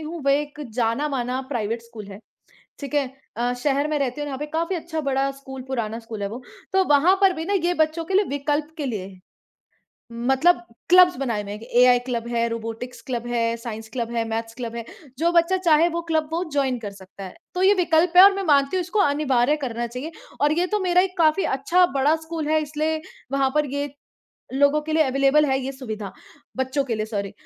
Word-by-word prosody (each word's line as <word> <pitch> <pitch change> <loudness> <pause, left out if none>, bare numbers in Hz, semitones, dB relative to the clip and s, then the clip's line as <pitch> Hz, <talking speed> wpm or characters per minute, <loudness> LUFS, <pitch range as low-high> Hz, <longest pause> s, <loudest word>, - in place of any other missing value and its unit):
हूँ, 320 +2 -6
वह 275 - +5
एक 295 0 -8
जाना 240 +5 0
माना 255 -2 -2
प्राइवेट 230 -3 -2
स्कूल 230 -3 -11
है, 195 - -10 0.6
ठीक 280 0 -6
है? 285 -2 +2 0.3
अ, 240 +2 0
शहर 285 +1 +1
में 305 -1 0
रहती 275 0 -2
हूँ, 290 - -3
यहाँ 270 -2 -5
पे 295 - -4
काफ़ी 335 +3 0
अच्छा 320 -1 -4
बड़ा 270 +1 +1
स्कूल, 270 -1 -9
पुराना 230 -4 -3
स्कूल 225 -2 -8
है 200 - -1
वो, 235 +5 -8 0.3
तो 380 0 +3
वहाँ 340 +7 +5
पर 390 -1 +5
भी 320 -2 -5
ना 395 - -2
ये 355 - +1
बच्चों 315 +2 -6
के 380 - -4
लिए 400 +2 +4
विकल्प 295 +2 -2
के 290 - -2
लिए 210 -7 -3
है। 190 -1 -13 0.9
मतलब 265 +6 +2 0.3
क्लब्स 360 -1 +7
बनाए 235 -6 -1
हुए 200 0 -7
हैं 210 - -6
कि 230 - -11
एआई 250 0 +6
क्लब 235 -2 -3
है, 235 -1 0
रोबोटिक्स 230 +2 -6
क्लब 240 -2 -3
है, 230 -1 0
साइंस 225 -1 -7
क्लब 235 -2 -3
है, 230 -1 0
मैथ्स 225 0 -4
क्लब 235 -1 -6
है, 235 - -5 0.3
जो 340 +2 +2
बच्चा 340 +2 +3
चाहे 335 -3 +4
वो - - 0
क्लब 315 -1 +1
वो 335 +2 0
जॉइन 270 -3 0
कर 205 - -4
सकता 195 0 -12
है। 185 - -9 0.2
तो 365 - -1
ये 390 +2 +6
विकल्प 335 0 +3
है 365 - +11
और 395 0 +8
मैं 395 - -2
मानती 285 +1 +3
हूँ - - +1
इसको 360 +5 -3
अनिवार्य 285 -4 +2
करना 240 -1 -3
चाहिए 250 +7 -7 0.3
और 295 +1 +3
ये 355 - +2
तो - - -1
मेरा 360 -1 +3
एक 370 -1 -4
काफ़ी 320 +3 +3
अच्छा 355 +7 +3
बड़ा 290 +4 +4
स्कूल 320 -2 -4
है 310 0 +3
इसलिए 310 +1 -2 0.3
वहाँ 275 -1 +2
पर 300 -1 +2
ये 285 -1 -3 0.6
लोगो 285 +2 +3
के 310 +1 -4
लिए 315 0 +4
अवेलेबल 275 +2 +3
है 265 -1 +1
ये 265 +1 -4
सुविधा 220 -7 -7 0.4
बच्चों 260 +2 0
के 235 -4 -2
लिए 215 - -2
सॉरी। 200 -3 -4
275 Hz, 225 wpm, -23 LUFS, 235-315 Hz, 0.9 s, है